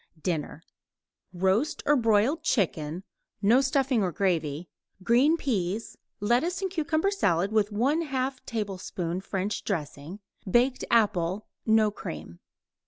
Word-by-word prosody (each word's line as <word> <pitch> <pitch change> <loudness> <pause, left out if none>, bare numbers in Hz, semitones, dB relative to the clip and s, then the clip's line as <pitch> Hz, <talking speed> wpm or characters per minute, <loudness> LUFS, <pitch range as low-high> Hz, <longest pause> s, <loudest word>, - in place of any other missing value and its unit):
DINNER 165 -2 -3 0.7
Roast 190 - 0
or 295 - +4
broiled 230 +5 +2
chicken 175 - -1 0.4
(no 220 +6 +4
stuffing 265 -3 +1
or 185 -2 0
gravy); 165 -3 -1 0.4
green 260 - +4
peas; 215 - -2 0.2
lettuce 245 - +1
and 380 -1 -2
cucumber 325 +2 0
salad 195 - +1
with 215 -2 +2
1/2 265 +3 0
tablespoon 190 -5 -3
French 195 +1 -3
dressing; 160 0 -4 0.3
baked 245 +5 +2
apple 205 -3 +2 0.2
(no 220 -1 +4
cream). 85 - -8
210 Hz, 110 wpm, -27 LUFS, 180-265 Hz, 0.7 s, or